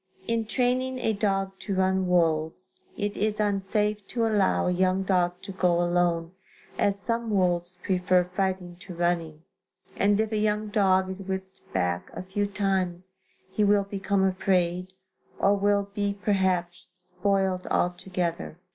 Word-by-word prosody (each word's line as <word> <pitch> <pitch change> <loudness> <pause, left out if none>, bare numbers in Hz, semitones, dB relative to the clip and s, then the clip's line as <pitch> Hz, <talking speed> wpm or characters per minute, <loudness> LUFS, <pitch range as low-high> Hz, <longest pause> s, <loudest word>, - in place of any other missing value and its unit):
In 230 -1 0
training 255 +3 0
a 225 -3 0
dog 195 -2 0
to 200 - -3
run 190 0 +2
wolves, 165 - 0 0.2
it 205 0 -2
is 210 +1 -1
unsafe 205 0 0
to 235 -2 0
allow 210 -3 +2
a 180 - +2
young 185 +1 +2
dog 180 -2 +2
to 195 - -6
go 180 -2 +2
alone, 175 -1 +1 0.4
as 200 0 +1
some 230 +2 -2
wolves 180 -3 +1
prefer 180 -1 +2
fighting 180 -1 -2
to 180 0 -10
running, 165 -2 -1 0.5
and 205 +1 +2
if 220 0 0
a 215 - 0
young 210 0 0
dog 190 -2 +2
is 190 +1 -7
whipped 190 0 -5
back 90 -2 -1
a - - -6
few 200 +2 -1
times, 190 -2 -1 0.4
he 210 - +1
will 205 0 +4
become 195 0 -1
afraid, 185 -1 +1 0.5
or 200 +1 +3
will 200 0 +2
be 205 -1 -1
perhaps, 185 -4 0
spoiled 185 +1 -1
altogether. 175 -2 -1
190 Hz, 145 wpm, -27 LUFS, 180-205 Hz, 0.5 s, will